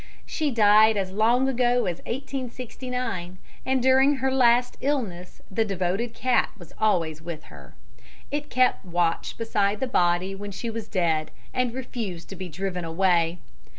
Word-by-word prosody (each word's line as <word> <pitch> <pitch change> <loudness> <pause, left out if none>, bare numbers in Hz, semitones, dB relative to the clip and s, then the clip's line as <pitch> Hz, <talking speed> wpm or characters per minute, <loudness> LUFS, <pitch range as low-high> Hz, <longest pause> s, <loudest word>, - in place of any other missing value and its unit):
She 305 -2 -1
died 215 -2 +5
as 190 -2 -1
long 235 +6 +3
ago 245 -1 +2
as 175 -2 -2
1869, 250 -6 -4 0.3
and 260 -1 +1
during 265 +2 +5
her 265 0 0
last 245 -1 +3
illness 220 -11 -3
the 225 +4 +2
devoted 195 +3 -2
cat 255 0 +2
was 175 -5 -14
always 165 -8 +1
with 160 -2 -7
her. 70 -3 -14 0.6
It 295 +1 -3
kept 255 0 +2
watch 175 -2 -1
beside 205 -2 0
the - - 0
body 180 -5 +1
when 205 +1 -6
she 215 +4 -5
was 225 -1 -5
dead, 165 -6 0 0.2
and 250 -1 +1
refused 220 -10 -5
to 195 - -7
be 185 -1 -6
driven 180 +2 -3
away. 170 0 +2
215 Hz, 150 wpm, -25 LUFS, 180-250 Hz, 0.6 s, died